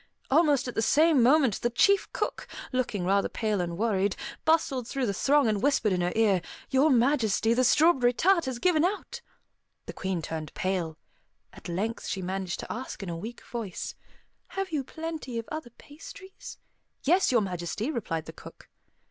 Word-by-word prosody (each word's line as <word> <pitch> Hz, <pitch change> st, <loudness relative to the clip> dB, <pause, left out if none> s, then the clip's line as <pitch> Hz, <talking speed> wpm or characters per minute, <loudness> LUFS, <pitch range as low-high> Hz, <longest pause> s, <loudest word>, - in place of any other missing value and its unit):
Almost 290 Hz, -3 st, +3 dB
at 245 Hz, -, -4 dB
the -, -, 0 dB
same 300 Hz, +5 st, +4 dB
moment, 260 Hz, -3 st, +4 dB
the 240 Hz, -, +1 dB
chief 395 Hz, -, +3 dB
cook, -, -, -3 dB, 0.2 s
looking 235 Hz, -8 st, -1 dB
rather 195 Hz, +2 st, +2 dB
pale 215 Hz, -4 st, -1 dB
and 170 Hz, -1 st, -4 dB
worried, 200 Hz, -2 st, +1 dB, 0.3 s
bustled 295 Hz, -7 st, +2 dB
through 270 Hz, -1 st, -2 dB
the 200 Hz, -, -1 dB
throng 280 Hz, +6 st, +3 dB
and 210 Hz, -2 st, 0 dB
whispered 265 Hz, -8 st, +2 dB
in 180 Hz, -, 0 dB
her 175 Hz, 0 st, 0 dB
ear, 210 Hz, -5 st, +3 dB, 0.3 s
"Your 270 Hz, +4 st, +4 dB
Majesty, 235 Hz, -4 st, +2 dB
the 255 Hz, +2 st, +2 dB
strawberry 265 Hz, -2 st, +4 dB
tart 340 Hz, +6 st, +2 dB
has 260 Hz, -2 st, -3 dB
given 320 Hz, +3 st, +2 dB
out!" 395 Hz, +4 st, -2 dB, 0.6 s
The -, -, -7 dB
Queen 190 Hz, -3 st, -3 dB
turned 155 Hz, -2 st, -6 dB
pale. 180 Hz, -4 st, -2 dB, 0.6 s
At -, -, -10 dB
length 210 Hz, +7 st, -3 dB
she 190 Hz, -, -3 dB
managed 185 Hz, 0 st, -3 dB
to -, -, -7 dB
ask 245 Hz, -3 st, -6 dB
in 190 Hz, -, -5 dB
a 170 Hz, -, -3 dB
weak 225 Hz, +8 st, -7 dB
voice, 225 Hz, -6 st, -5 dB, 0.5 s
"Have 390 Hz, -2 st, -4 dB
you 295 Hz, -4 st, -1 dB
plenty 315 Hz, -4 st, -6 dB
of 230 Hz, -, -4 dB
other 310 Hz, -5 st, -5 dB
pastries?" 315 Hz, -, -12 dB, 0.5 s
"Yes, 355 Hz, +4 st, +3 dB
Your 240 Hz, -3 st, +4 dB
Majesty," 185 Hz, -, -3 dB
replied 165 Hz, -, -3 dB
the -, -, -9 dB
cook. -, -, -14 dB
235 Hz, 175 wpm, -28 LUFS, 195-295 Hz, 0.6 s, same